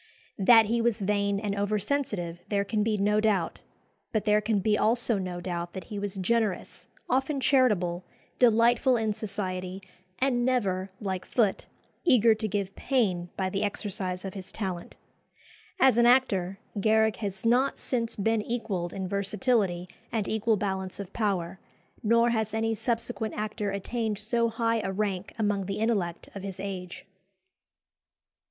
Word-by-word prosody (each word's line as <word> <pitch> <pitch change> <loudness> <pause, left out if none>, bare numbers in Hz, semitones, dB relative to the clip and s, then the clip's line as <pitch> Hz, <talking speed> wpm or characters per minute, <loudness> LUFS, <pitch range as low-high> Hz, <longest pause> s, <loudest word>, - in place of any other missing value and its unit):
That 225 +3 +7
he 230 +2 +1
was 230 -1 +1
vain 200 0 +1
and 205 -1 -2
over 205 +1 0
sensitive 205 -7 -2
there 200 -1 0
can 210 +1 0
be 215 0 +1
no 210 +1 +2
doubt; 200 -6 0 0.5
but 215 - -1
there 210 0 +4
can 215 0 +1
be 210 +2 +2
also 230 0 +2
no 180 -2 -4
doubt 175 -1 -4
that 190 - -6
he 205 - -3
was 200 -1 -4
generous, 210 +1 -1 0.2
often 270 +3 +1
charitable, 205 -11 +2 0.4
delightful 240 +2 +4
in 220 -2 0
society, 190 -3 -4 0.4
and 255 -2 +1
never, 200 -7 0
like 190 -3 -3
Foote, 210 -1 0 0.4
eager 235 -8 +5
to 215 0 -3
give 200 -1 -2
pain 190 -10 0
by 190 - 0
the 195 +1 -2
exercise 195 -3 -3
of 190 - -5
his 190 -2 -7
talent. 185 -5 -5 0.8
As 260 -3 +5
an 235 0 +6
actor, 195 -7 +3 0.2
Garrick 220 +1 +3
has 200 -1 -5
not 250 +4 +3
since 230 -3 -2
been 220 +2 +1
equalled 205 -7 -3
in 190 -1 -3
versatility 200 -2 0 0.2
and 220 -4 -1
equal 220 0 +1
balance 190 -2 -3
of 200 -1 -7
power; 190 -4 -1 0.4
nor 230 +2 +4
has 220 -2 -1
any 225 0 +1
subsequent 230 0 -2
actor 210 -1 -2
attained 215 +2 -2
so 230 +3 +1
high 230 0 0
a 195 - -2
rank 195 -1 -2
among 205 -3 0
the 195 - -3
intellect 200 -7 -1
of 200 - -7
his 195 -1 -6
age. 185 -2 -6
210 Hz, 155 wpm, -28 LUFS, 190-230 Hz, 0.8 s, That